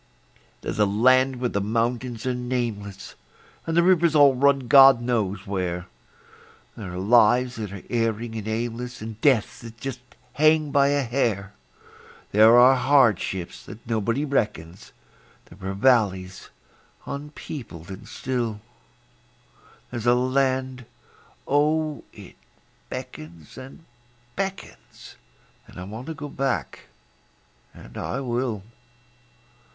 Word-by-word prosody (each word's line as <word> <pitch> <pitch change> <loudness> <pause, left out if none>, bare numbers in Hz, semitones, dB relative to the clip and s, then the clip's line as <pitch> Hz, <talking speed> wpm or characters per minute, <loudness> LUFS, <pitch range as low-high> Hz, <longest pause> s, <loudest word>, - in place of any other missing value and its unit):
There's - - -5
a 105 - +4
land 130 +6 +3
where 125 0 -2
the 100 - -2
mountains 115 +2 -2
are 130 - 0
nameless, 120 -6 -4 0.5
And 165 0 -1
the 170 - +5
rivers 170 -3 +3
all 145 -2 +6
run 135 0 +2
God 135 0 +8
knows 105 -5 -2
where; 90 -3 -3 0.9
There 95 -5 -8
are - - -5
lives 120 +5 +3
that 105 -3 -5
are 100 -2 -9
erring 115 -1 -2
and 110 -1 -5
aimless, 120 +1 -4
And 110 0 -8
deaths 130 -8 +2
that 115 -1 -11
just 135 -1 -5 0.3
hang 155 0 +3
by 140 0 +4
a 145 0 +1
hair; 115 -5 -1 0.8
There 110 +3 +6
are 125 +2 +7
hardships 120 -9 +1
that 110 - -11
nobody 115 +5 -1
reckons; 105 - -3 0.5
There 95 +2 -9
are 95 - -4
valleys 100 -5 +1 0.6
unpeopled 140 - -8
and 95 - -10
still; 120 -5 -3 1.3
There's 120 0 -4
a 120 - +5
land 130 -1 -1 0.6
oh, 150 +1 +1
it - - -14 0.5
beckons 80 -1 -9
and 135 +5 -12 0.5
beckons, 195 0 -7 0.5
And - - -12
I - - -6
want 110 +7 -8
to 160 - -5
go 145 0 -7
back 125 - -3 0.9
and - - -14
I 130 - -3
will. 120 -5 -2
120 Hz, 125 wpm, -24 LUFS, 105-135 Hz, 1.3 s, God